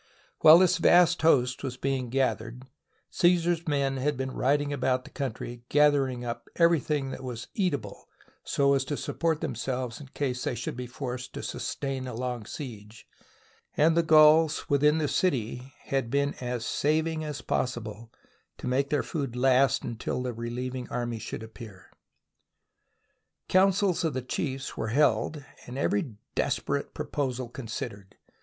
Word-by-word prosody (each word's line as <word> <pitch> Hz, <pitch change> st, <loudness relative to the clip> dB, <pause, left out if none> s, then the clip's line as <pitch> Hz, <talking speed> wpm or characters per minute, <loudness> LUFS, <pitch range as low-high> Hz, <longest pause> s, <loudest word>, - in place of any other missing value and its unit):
While 155 Hz, +1 st, +9 dB
this 185 Hz, -1 st, +4 dB
vast 175 Hz, 0 st, +5 dB
host 125 Hz, -6 st, +3 dB
was 130 Hz, -2 st, -4 dB
being 135 Hz, -2 st, -1 dB
gathered, 125 Hz, -2 st, -1 dB, 0.5 s
Cassar's 175 Hz, -1 st, +2 dB
men 140 Hz, -2 st, 0 dB
had 140 Hz, +1 st, 0 dB
been 130 Hz, 0 st, -3 dB
riding 145 Hz, +3 st, +1 dB
about 130 Hz, -1 st, 0 dB
the -, -, -14 dB
country 120 Hz, -3 st, -5 dB
gathering 140 Hz, -4 st, +3 dB
up 120 Hz, 0 st, -5 dB
everything 150 Hz, -5 st, +2 dB
that 130 Hz, -, -7 dB
was 120 Hz, -2 st, -6 dB
eatable 180 Hz, -8 st, -2 dB, 0.4 s
so 140 Hz, 0 st, +2 dB
as 135 Hz, -1 st, +2 dB
to 145 Hz, +1 st, -3 dB
support 165 Hz, -2 st, -1 dB
themselves 125 Hz, +1 st, -3 dB
in 140 Hz, -, -10 dB
case 130 Hz, -2 st, -3 dB
they -, -, -1 dB
should 120 Hz, -, -4 dB
be 125 Hz, 0 st, -5 dB
forced 125 Hz, 0 st, -6 dB
to -, -, -6 dB
sustain 135 Hz, -2 st, -4 dB
a 125 Hz, -, -5 dB
long 125 Hz, -2 st, -4 dB
siege, 110 Hz, -6 st, -8 dB, 0.7 s
and 160 Hz, +2 st, +4 dB
the 170 Hz, -, +5 dB
Gauls 155 Hz, 0 st, +5 dB
within 150 Hz, +2 st, +3 dB
the 155 Hz, -2 st, 0 dB
city 130 Hz, -6 st, -1 dB
had 135 Hz, -4 st, -2 dB
been 140 Hz, +2 st, +1 dB
as 120 Hz, -2 st, -3 dB
saving 155 Hz, +2 st, 0 dB
as 150 Hz, -2 st, -5 dB
possible 115 Hz, -2 st, -3 dB, 0.5 s
to -, -, -8 dB
make 135 Hz, +2 st, +1 dB
their 145 Hz, -, +1 dB
food 140 Hz, -7 st, -4 dB
last 130 Hz, +1 st, +3 dB
until 120 Hz, +2 st, -3 dB
the 125 Hz, -1 st, -3 dB
relieving 125 Hz, +2 st, -5 dB
army 120 Hz, -2 st, -3 dB
should 110 Hz, -, -6 dB
appear. 110 Hz, -3 st, -12 dB, 1.6 s
Councils 190 Hz, -1 st, +3 dB
of 160 Hz, -4 st, -1 dB
the 130 Hz, -, -2 dB
chiefs 135 Hz, +1 st, -3 dB
were -, -, -3 dB
held 135 Hz, +3 st, +1 dB, 0.2 s
and 125 Hz, +2 st, -7 dB
every 165 Hz, -, 0 dB, 0.2 s
des -, -, +1 dB
perate -, -, -3 dB
proposal 130 Hz, -3 st, -2 dB
considered. 110 Hz, -5 st, -7 dB
135 Hz, 150 wpm, -28 LUFS, 125-150 Hz, 1.6 s, While